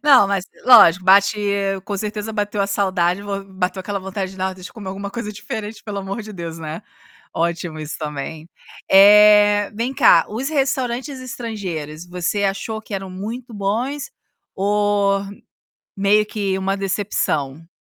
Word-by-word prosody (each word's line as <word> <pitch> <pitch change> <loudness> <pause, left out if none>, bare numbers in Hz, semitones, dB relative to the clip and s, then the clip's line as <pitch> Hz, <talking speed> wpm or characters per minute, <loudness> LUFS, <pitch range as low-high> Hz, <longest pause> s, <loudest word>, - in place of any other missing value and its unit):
Não 275 -8 +6
mas 195 -2 -1 0.2
lógico 195 -8 +7
bate 200 +3 +5 0.5
com 205 0 -3
certeza 210 +2 -4
bateu 205 -1 -2
a 200 - +1
saudade, 190 -2 0
vou 200 -1 -4
bateu 190 -1 -3
aquela 200 +1 -3
vontade 190 0 -5
de 185 -1 -4 0.2
alguma 195 +1 -5
coisa 210 0 -5
diferente 210 +1 -7
pelo 205 -2 -5
amor 195 +3 -5
de 215 0 -10
Deus, 170 -3 -7
né. 155 0 -6 0.5
Ótimo 170 -1 -2
isso 155 0 -6
também. 155 +1 -6 0.4
Eh, 205 +1 +7
vem 235 +5 -2
cá, 165 - +6
os 240 +6 -3
restaurantes 265 -2 -1
estrangeiros 185 -11 -6
você 180 +3 -2
achou 210 +3 -2
que 215 - -7
eram 190 -1 -5
muito 230 +6 -7
bons 235 +8 -2 0.4
ou 200 0 +1 0.7
meio 205 +1 +3
que 200 -3 -2
uma 195 +1 -1
decepção? 165 -7 -2
200 Hz, 140 wpm, -20 LUFS, 185-210 Hz, 0.7 s, lógico